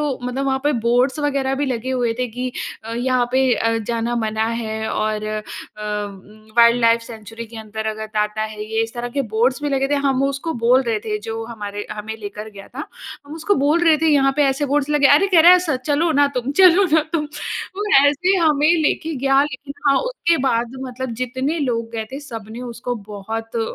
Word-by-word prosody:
तो 290 -3 -1
मतलब 250 +2 -2
वहाँ 265 0 +1
पे 295 - +3 0.2
बोर्ड्स 255 +5 +2
वग़ैरह 275 -2 0
भी - - 0
लगे 255 0 -3
हुए 245 -3 0
थे 250 - 0
कि 250 +3 -4 0.3
अ, 225 - -6
यहाँ 250 0 +1
पे 260 -1 +3
अ, 230 0 0
जाना 230 +2 -2
मना 220 +1 -1 0.2
है। 220 0 -3
और 215 0 -1
अ, 215 0 -3 1.1
वाइल्डलाइफ 235 0 +5
सेंचुरी 225 0 -9
के 225 +1 -12
अंदर 220 0 -6
अगर 220 0 -3
ताता 215 0 -1
है 215 -1 -5
ये, 220 +1 -1
इस 225 +1 -5
तरह 240 0 -4
के 275 - +2
बोर्ड्स 250 +6 +1
भी 290 - 0
लगे 270 -1 0
थे, 290 - +1
हम 275 -2 +1
उसको 275 +4 -2
बोल 240 +2 +4
रहे 230 -3 -1
थे 210 0 -3
जो 225 0 -4
हमारे 205 -3 -6
हमें 215 +1 -5
लेकर 210 0 -7
गया 200 -1 -12
था। 285 +4 -7 0.4
हम 295 - -8
उसको 330 +5 0
बोल 295 +5 +2
रहे 320 -2 +6
थे 320 0 +2
यहाँ 275 -2 +4
पे 295 - +4
ऐसे 275 +2 +1
बोर्ड्स 285 +1 0
लगे, 295 -2 +4
अरे! 295 +8 +5
कह 335 - +7
रहा 345 +3 +9
है 365 - +7
स 355 -3 -3 0.2
"चलो 310 +3 +2
ना 285 0 +4
तुम, 250 +2 -2
चलो 370 +1 +7
ना 320 - +5
तुम।" 305 -3 0
तो 380 +6 -6 0.2
ऐसे 360 +7 +2
हमें 305 -3 +3
लेके 320 +2 0
गया 270 +1 +3
लेकिन 280 0 -6 0.2
हाँ, 275 - +4
उसके - - 0
बाद 235 0 0
मतलब 255 -1 -5
जितने 260 +6 -2
लोग 230 -5 -1
गए 220 -1 -3
थे 275 - -5
सबने 225 -4 -8
उसको 245 0 -4 0.2
बहुत 225 +3 -5
अ, - - +1
250 Hz, 215 wpm, -20 LUFS, 225-285 Hz, 1.1 s, रहा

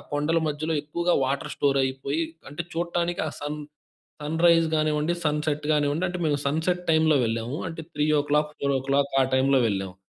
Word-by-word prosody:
కొండల 150 +3 +1
మధ్యలో 155 +2 -2
ఎక్కువగా 170 +4 0
వాటర్ 135 +1 -2
స్టోర్ 140 -1 +2
అయిపోయి. 135 +4 -2 0.3
అంటే 155 +4 -5
చూడటానికి 170 +1 -1
ఆ - - -5
సన్ 150 +1 -4 0.6
సన్‌రైజ్ 165 +2 +3
కానివ్వండి 155 +1 +1
సన్‌సెట్ 150 0 -1
కానివ్వండి 145 +3 +1
అంటే 180 0 -4
మేము 145 -2 +1
సన్‌సెట్ 160 +5 0
టైమ్‌లో 160 -1 +4
వెళ్ళాము. 115 +4 -3
అంటే 165 0 -7
3, 150 0 +1
4 140 0 +1
ఓ - - -3
క్లాక్ 140 0 +2
ఆ - - +3
టైమ్‌లో 135 0 +3
వెళ్ళాము. 95 -3 -3
150 Hz, 160 wpm, -25 LUFS, 140-160 Hz, 0.6 s, టైమ్‌లో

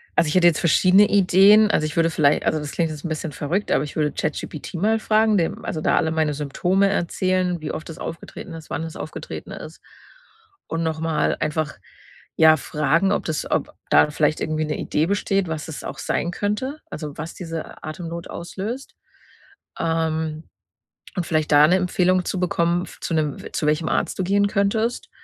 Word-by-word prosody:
also, 165 - +3
ich 150 - -1
hätte 180 -1 +6
jetzt 165 -3 +3
verschiedene 185 +4 +5
Ideen 205 +2 +6
also, 155 - +1
ich 155 - -4
würde 165 0 +3
viellei 150 -3 +2
also, 155 - +1
das 150 -1 -5
klingt 165 -2 0
jetzt 150 0 -8
'n - - -2
bisschen 155 0 -3
verrückt, 165 +9 -2
aber 135 - +3
ich 145 - -9
würde 150 -1 +1
ChatGPT 150 0 -4
mal 215 +6 +2
fragen, 215 0 +3
dem 165 -3 -1
also, 160 - -3
da - - +2
alle 160 - +1
meine 160 -2 +1
Symptome 175 +7 +1
erzählen, 185 -1 0
wie 155 - -4
oft 160 - -6
es 165 - -8
aufgetreten 165 +1 -7
ist, 160 -1 -10
wann - - -3
es 165 -1 -7
aufgetreten - - -7
ist - - -9 0.9
und 165 +1 -2
noch 160 -1 -2
mal 160 -2 0
einfach, 155 0 -2 0.6
ja, 160 -1 +7
fragen, 160 +6 +1
ob - - -1
das 155 -2 -3
ob - - -1 0.2
da - - +5
vielleicht 150 0 +1
irgendwie 155 0 -1
'ne 150 - -3
Idee 155 +2 0
besteht, 195 -1 0
was 160 -2 -4
es 155 - -7
auch - - -6
sein 175 - -1
könnte 210 +10 -2
also, 150 -2 -6
was 160 +2 -6
diese 165 -3 -7
Atemnot 165 +2 -6
auslöst. 205 +9 -6 0.8
Ähm, 160 -1 -1 0.7
und 180 -3 -1
vielleicht 155 -2 0
da 145 +1 +8
'ne 180 - +4
Empfehlung 185 0 +2
zu 185 - -2
bekommen, 175 0 +1 0.2
zu - - -3
'nem 150 -3 0 0.2
zu 150 - -1
welchem 155 +1 +1
Arzt - - -1
du 185 - 0
gehen 200 +2 +3
könntest. 220 +3 0
165 Hz, 190 wpm, -22 LUFS, 155-185 Hz, 0.9 s, da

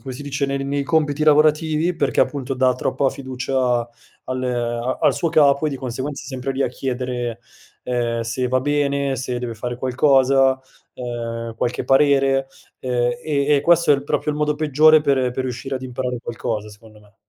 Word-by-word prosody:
come 130 -2 -7
si 135 - -8
dice, 140 0 -2
nel 135 0 -2
nei 140 +1 -1
compiti 150 0 0
lavorativi 155 +2 +3
perché 140 -5 0
appunto 135 -2 -1
dà 130 -1 +2
troppa 130 +1 0
fiducia 130 -2 -1 0.4
al 130 0 -4
a 120 0 -2
al - - +4
suo 170 - -1
capo 150 -2 +4
e - - +2
di 140 - -4
conseguenza 130 +3 -5
è - - -11
sempre 130 0 -4
lì 135 +1 -1
a - - +1
chiedere, 125 -2 -4 0.4
ehm, 120 -2 -1
se 125 +2 -2
va 130 +1 +1
bene, 140 -1 0
se 125 0 -3
deve 120 -2 -5
fare 120 +2 -5
qualcosa, 130 +1 +3 0.4
ehm, 115 -2 -5
qualche 120 +2 -2
parere. 135 -1 +3 0.3
Ehm, 120 -1 0
e 145 -1 +1
e - - +2
questo 170 +1 +3
è - - +6
il 140 0 -4
proprio 150 +1 -1
il 150 - -4
modo 150 0 +1
peggiore 155 +1 +4
per 135 -4 +1
per 130 - -2
riuscire 130 +2 -4
ad 130 - -4
imparare 125 -1 -3
qualcosa 110 -2 -4
secondo 105 +1 -16
me. 105 -1 -23
130 Hz, 185 wpm, -21 LUFS, 125-145 Hz, 0.4 s, è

